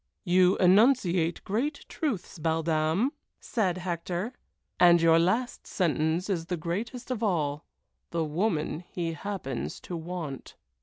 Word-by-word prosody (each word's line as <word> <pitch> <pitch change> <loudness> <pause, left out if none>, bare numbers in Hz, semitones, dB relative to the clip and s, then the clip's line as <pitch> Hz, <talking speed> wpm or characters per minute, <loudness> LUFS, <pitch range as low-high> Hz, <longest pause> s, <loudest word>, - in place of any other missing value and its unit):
"You 180 +1 +4
enunciate 185 -4 +4
great 270 +9 -2
truths, 225 - -3
belle 160 +1 0
dame!" 160 - +1 0.3
said 190 -7 -1
Hector, 180 +4 -3 0.5
"and 175 -1 +7
your 165 0 +5
last 220 +9 0
sentence 165 0 0
is 170 -5 -2
the 180 - -2
greatest 225 +10 -4
of 240 -3 -2
all 155 -8 0 0.5
'_The 165 -2 0
woman 160 -1 -1
he 175 -1 -4
happens 145 - -4
to 180 - -6
want. 165 -4 -6
175 Hz, 130 wpm, -28 LUFS, 165-200 Hz, 0.5 s, and